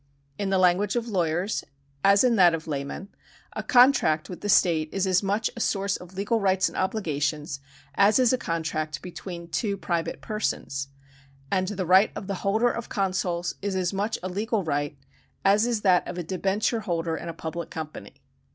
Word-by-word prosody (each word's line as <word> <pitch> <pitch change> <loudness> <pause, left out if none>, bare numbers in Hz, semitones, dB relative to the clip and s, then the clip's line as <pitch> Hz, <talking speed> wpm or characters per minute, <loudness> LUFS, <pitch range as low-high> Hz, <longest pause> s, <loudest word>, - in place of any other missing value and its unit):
In 200 -1 -1
the 195 - +2
language 185 +3 +3
of 240 -1 -1
lawyers, 180 0 0 0.4
as 200 +2 +6
in 245 -2 +4
that 175 -5 +6
of 160 - -7
laymen, 145 +6 -5 0.4
a - - -3
contract 245 - +4
with 180 - -8
the 205 - -3
state 165 -5 +3
is 195 0 0
as 185 -1 +3
much 205 +2 0
a - - -7
source 200 -2 0
of 180 +1 -10
legal 205 +4 0
rights 190 -2 +2
and - - -8
obligations, 150 -7 -1 0.3
as 200 +2 +4
is 255 -1 +4
a - - +3
contract 155 -3 -3
between 175 -1 -7
two 200 +4 -1
private 170 -3 -2
persons; 140 -10 -3 0.6
and 185 -1 +1
the 195 -2 -3
right 190 +4 +6
of - - -6
the 200 - -3
holder 220 +5 +2
of 235 - -6
consols 185 -3 -1
is 200 -1 -2
as 185 0 0
much 205 +3 -1
a - - -2
legal 205 +3 -1
right, 145 -2 -2 0.5
as 205 +4 +4
is 235 -3 0
that 185 -3 +3
of 180 - -6
a 175 - -2
debenture 195 +6 0
holder 170 -5 -2
in 170 - -6
a - - -2
public 165 +1 -5
company. 155 -10 -8
190 Hz, 190 wpm, -26 LUFS, 165-205 Hz, 0.6 s, as